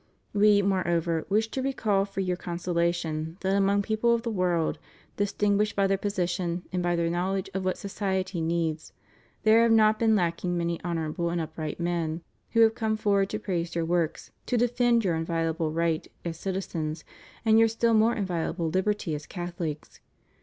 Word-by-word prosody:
We, 205 0 +5
moreover, 170 -4 0
wish 220 +3 +2
to 260 - -3
recall 215 -7 +1
for 195 -1 -4
your 180 -1 0
consolation, 170 -2 -2
that 190 0 +1
among 200 +1 +2
people 225 +2 +2
of 230 - -3
the 235 - -2
world, 180 -5 0 0.4
distinguished 205 +1 +1
by 200 - +3
their 195 0 +2
position, 180 -3 -2
and 180 - 0
by 175 0 +1
their 170 0 +1
knowledge 185 +2 -1
of 190 0 -2
what 185 0 -1
society 190 -3 -2
needs 160 -1 -2 0.5
there 220 +1 +6
have 230 0 +4
not 215 -1 +5
been 225 -1 +4
lacking 175 -1 0
many 170 -1 -2
honorable 170 0 -2
and 170 0 -1
up 160 -1 -5
right 155 -1 -4
men 170 -1 -2 0.3
who 230 - +5
have 225 0 +6
come 220 -1 -1
forward 200 -2 +2
to 215 - -2
praise 175 -5 -3
your 165 -1 0
works, 170 -1 -1 0.2
to 245 - +1
defend 240 -1 +2
your 175 - +2
inviolable 165 0 -1
right 165 0 0 0.2
as 170 -1 -3
citizens, 170 -5 -3 0.4
and 220 0 +6
your 225 - +6
still 230 +1 +1
more 225 +2 +4
inviolable 175 -4 -2
liberty 190 -1 0
as 150 0 -5
Catholics. 175 -4 -5
185 Hz, 175 wpm, -27 LUFS, 170-210 Hz, 0.5 s, there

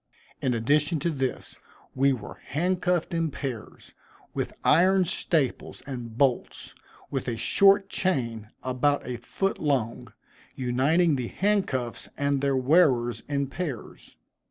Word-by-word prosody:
In 125 -2 +1
addition 150 +8 +2
to 170 - 0
this, 135 -4 -4 0.4
we 135 +1 +3
were 115 -6 -6
handcuffed 180 +2 0
in 165 -1 0
pairs, 130 -5 -7 0.4
with - - -2
iron 185 +3 +4
staples 155 -5 0
and 120 -4 -7
bolts, 135 -3 0 0.4
with 135 -2 -3
a 115 -2 -2
short 195 - +4
chain, 115 - -1
about 130 +3 0
a 125 -1 -3
foot 195 - -2
long, 130 -7 -1 0.4
uniting 140 +6 +2
the 125 -2 -3
handcuffs 185 - -1
and 140 -1 0
their 140 -1 +1
wearers 130 -4 +3
in 140 -1 0
pairs. 140 -3 -7
140 Hz, 125 wpm, -26 LUFS, 125-170 Hz, 0.4 s, iron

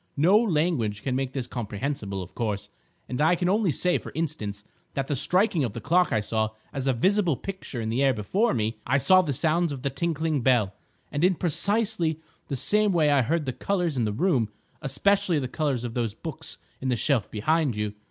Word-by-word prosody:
No 170 +8 +5
language 155 - +1
can 130 -2 -1
make 135 0 -2
this 130 -3 -2
comprehensible, 105 -4 -4
of 90 - -13
course, 105 -4 -3 0.4
and 125 +2 -3
I 160 +3 +4
can 175 +1 -1
only 200 +1 +2
say, 180 +4 +1
for - - -9
instance, 110 -11 -3 0.3
that 135 - 0
the 145 - -1
striking 180 - +2
of 115 -5 -2
the - - -5
clock 180 +4 +2
I 110 - +2
saw 110 +1 0 0.2
as 135 -2 -3
a 135 - +3
visible 185 - +2
picture 190 -6 -6
in 110 -1 -2
the 120 +4 0
air 135 -1 +5
before 135 - 0
me. 110 -1 -1
I 135 +3 +3
saw 185 +7 +5
the 160 -6 -2
sounds 160 +4 +1
of 135 -2 -6
the 140 - 0
tinkling 160 0 -1
bell. 115 -6 +3 0.4
And 145 - -1
in 185 0 +4
precisely 180 -1 0 0.3
the 140 - -2
same 210 - +2
way 155 -4 +3
I 140 -2 +4
heard 150 +6 0
the 130 - -2
colours 180 0 -1
in 120 -3 +1
the 105 - 0
room, 120 - +1 0.3
especially 175 +5 +2
the 135 -3 -1
colours 135 -3 -1
of 120 -2 -4
those 115 -4 -2
books 160 +1 -7 0.2
in 130 - -2
the 125 - +2
shelf 120 -2 +1
behind 145 +4 +1
you. 105 -1 -2
140 Hz, 210 wpm, -26 LUFS, 120-170 Hz, 0.4 s, No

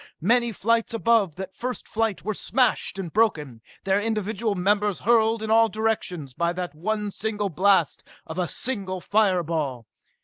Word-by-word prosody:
Many 235 +6 +2
flights 230 +2 0
above 225 -7 +2
that 190 0 -7
first 250 0 -5
flight 220 -4 -1
were 215 - -1
smashed 245 0 0
and 180 -5 -5
broken, 150 - +1 0.2
their 195 +1 +2
individual 215 0 -1
members 205 +1 +1
hurled 225 0 +3
in 220 - -2
all 225 0 +5
directions 210 - -2
by 170 +5 0
that 180 -3 -4
one 210 +6 -2
single 210 -1 -2
blast 185 -2 +2 0.2
of 160 +3 -6
a 180 - 0
single 195 -7 -3
fire 195 -2 +2
ball. 145 -7 -3
205 Hz, 160 wpm, -24 LUFS, 180-225 Hz, 0.2 s, all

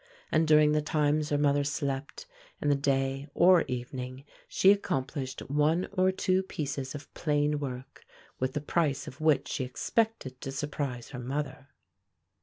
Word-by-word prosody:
And 160 0 +3
during 150 -1 +6
the 150 0 +2
times 150 0 +1
her 145 - +1
mother 145 0 +3
slept, 140 - -3 0.3
in - - 0
the 145 - +4
day 135 0 0
or 180 0 +6
evening, 125 +1 -5 0.2
she 190 - +5
accomplished 135 -8 -2
one 150 +5 +2
or 185 -1 +3
two 185 0 +1
pieces 140 -6 -4
of 145 - -10
plain 150 -1 +1
work, 130 -3 -7 0.4
with 130 0 -1
the 150 - -2
price 145 -3 0
of 130 - -9
which 155 -3 +3
she 130 - -2
expected 130 - -1
to 135 - -4
surprise 140 -3 -4
her 125 - -7
mother. 135 +2 -4
145 Hz, 155 wpm, -29 LUFS, 135-155 Hz, 0.4 s, during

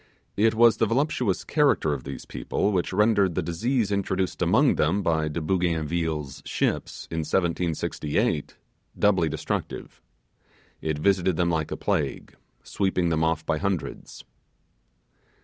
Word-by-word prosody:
It 110 +2 +3
was 115 0 +5
the 115 - +2
voluptuous 125 -4 0
character 145 - +2
of 65 -3 -6
these 70 0 -7
people 105 - -1
which 90 -3 0
rendered 100 -3 +3
the - - 0
disease 105 +7 0
introduced 95 -2 -1
among - - +4
them 95 +7 +1
by 80 -2 +1
De 75 +2 -3
Bougainville's 80 -3 -1
ships, - - -2
in 80 - -2
1768, 80 -3 -1 0.4
doubly 95 -6 +3
destructive. - - -4 0.8
It 80 -1 -2
visited 95 +2 +2
them 85 0 +2
like 80 -2 -1
a - - -4
plague, - - -2 0.3
sweeping 95 -3 0
them 80 -1 +1
off 80 -1 0
by 80 - 0
hundreds. 95 -1 -4
85 Hz, 130 wpm, -25 LUFS, 80-100 Hz, 0.8 s, was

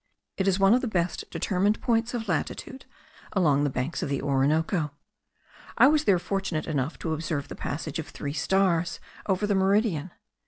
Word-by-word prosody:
It 190 - 0
is 190 -1 +3
one 195 +2 +6
of 250 - +3
the 255 - -2
best 180 -5 -1
determined 200 +2 +1
points 235 0 0
of 225 -2 -4
latitude 190 - -3 0.5
along 150 -7 +3
the 145 - +2
banks 130 +5 -3
of - - -2
the 140 - 0
Orinoco. 150 +4 +1 0.9
I - - +8
was 305 0 +2
there 195 - +5
fortunate 190 -3 -2
enough 145 -1 -2
to 160 - 0
observe 155 -2 -3
the - - -6
passage 155 +1 -4
of 155 - -5
three 145 0 -5
stars 170 +1 +1 0.3
over 195 +1 +1
the 205 - +1
meridian. 190 -4 +2
175 Hz, 180 wpm, -27 LUFS, 150-200 Hz, 0.9 s, I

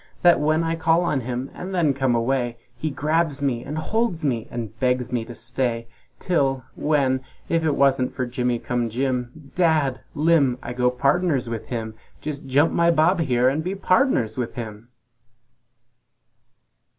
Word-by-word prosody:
That 175 -1 +6
when 155 +2 +2
I 165 0 0
call 165 +1 +2
on 150 -6 0
him 125 +2 -4
and 190 +1 -6
then 160 -6 +3
come 130 -2 +1
away, 120 0 0 0.2
He 155 - -3
grabs 155 +1 0
me 130 -4 -1
and 150 +2 -5
holds 200 -1 -1
me 120 -5 -1
and 115 -2 -5
begs 125 -1 0
me 120 -2 0
to 120 - -9
stay, 120 -1 -1 0.3
Till 135 -7 0
well, 140 -4 +1 0.3
if 165 -1 +1
it 155 -3 +1
wasn't 135 -2 +3
for 130 - -3
Jimmy 125 0 -1
cum 120 0 -2
Jim, 130 +3 -3
Dadd! 155 -7 +2 0.2
Limb! 150 -5 +3
I'd 120 +1 -6
go 125 0 +3
pardners 140 +2 +1
with 115 -2 -5
him! 115 -3 -4 0.3
Jes' 150 -2 -3
jump 140 +3 +2
my 170 0 +3
bob 170 +3 +3
here 125 -5 +2
and 145 +4 +1
be 185 +3 -2
pardners 185 - +2
with 120 - -3
him!" 110 -1 -7
135 Hz, 165 wpm, -23 LUFS, 125-160 Hz, 0.3 s, That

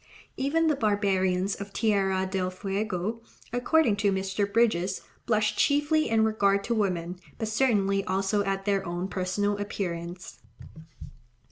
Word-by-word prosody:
Even 300 +5 +1
the 310 -2 +3
barbarians 195 -4 +1
of 200 0 -7
Tierra 195 -3 +1
del 185 -1 -1
Fuego, 195 +2 -3 0.3
according 245 -1 +3
to 205 -1 +2
Mr. 195 +1 -1
Bridges, 200 -5 +1 0.3
blush 215 -2 +2
"chiefly 295 +2 +2
in 220 -1 +3
regard 200 -2 +2
to 235 - -1
women, 180 -5 -1 0.2
but 220 - -3
certainly 205 -4 +2
also 195 +2 0
at 195 -1 -2
their 200 -2 +1
own 175 +1 -3
personal 200 +2 -1
appearance." 175 -3 -5
200 Hz, 130 wpm, -27 LUFS, 190-220 Hz, 0.3 s, the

